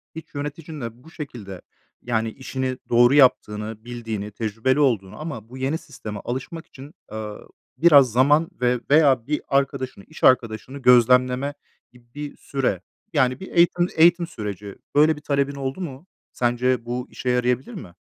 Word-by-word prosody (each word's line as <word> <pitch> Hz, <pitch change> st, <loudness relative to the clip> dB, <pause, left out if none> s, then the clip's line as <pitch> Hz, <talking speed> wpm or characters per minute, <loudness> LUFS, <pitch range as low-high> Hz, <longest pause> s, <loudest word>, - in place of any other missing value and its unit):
hiç 160 Hz, -2 st, -10 dB
yöneticinle 145 Hz, -5 st, -6 dB
bu 160 Hz, -, -15 dB
şekilde 115 Hz, -, -8 dB, 0.4 s
yani 115 Hz, -2 st, -1 dB
işini 130 Hz, 0 st, -4 dB
doğru 120 Hz, +2 st, +5 dB
yaptığını, 110 Hz, -5 st, +2 dB
bildiğini, 115 Hz, -4 st, -5 dB
tecrübeli 115 Hz, +6 st, -1 dB
olduğunu 115 Hz, -10 st, +1 dB
ama 120 Hz, -9 st, -7 dB
bu 130 Hz, -, -10 dB
yeni 135 Hz, +4 st, -1 dB
sisteme 110 Hz, -10 st, -8 dB
alışmak 135 Hz, +7 st, -5 dB
için, 140 Hz, +4 st, -13 dB, 0.2 s
ııı, 105 Hz, -1 st, -7 dB, 0.3 s
biraz 145 Hz, -7 st, +6 dB
zaman 145 Hz, +7 st, +3 dB
ve 125 Hz, 0 st, +2 dB
veya 140 Hz, -5 st, +4 dB
bir 150 Hz, 0 st, -1 dB
arkadaşını, 135 Hz, -5 st, -1 dB
iş 155 Hz, -, -13 dB
arkadaşını 120 Hz, +1 st, +2 dB
gözlemleme 125 Hz, +2 st, +4 dB, 0.4 s
gibi 125 Hz, +5 st, -9 dB
süre, 130 Hz, -10 st, -2 dB, 0.3 s
yani 130 Hz, -4 st, +2 dB
bir 190 Hz, -, -9 dB
eğitim 175 Hz, +1 st, +3 dB
eğitim 170 Hz, +1 st, +5 dB
süreci 105 Hz, -, -7 dB, 0.2 s
böyle 155 Hz, +2 st, +5 dB
bir 150 Hz, -, -12 dB
talebin 140 Hz, -1 st, 0 dB
oldu 135 Hz, +5 st, -4 dB
mu? 145 Hz, 0 st, -7 dB, 0.3 s
Sence 120 Hz, 0 st, 0 dB
bu 125 Hz, +1 st, -4 dB
işe 125 Hz, -, -4 dB
yarayabilir 125 Hz, +1 st, 0 dB
mi? 85 Hz, -3 st, -9 dB
130 Hz, 145 wpm, -23 LUFS, 115-145 Hz, 0.4 s, biraz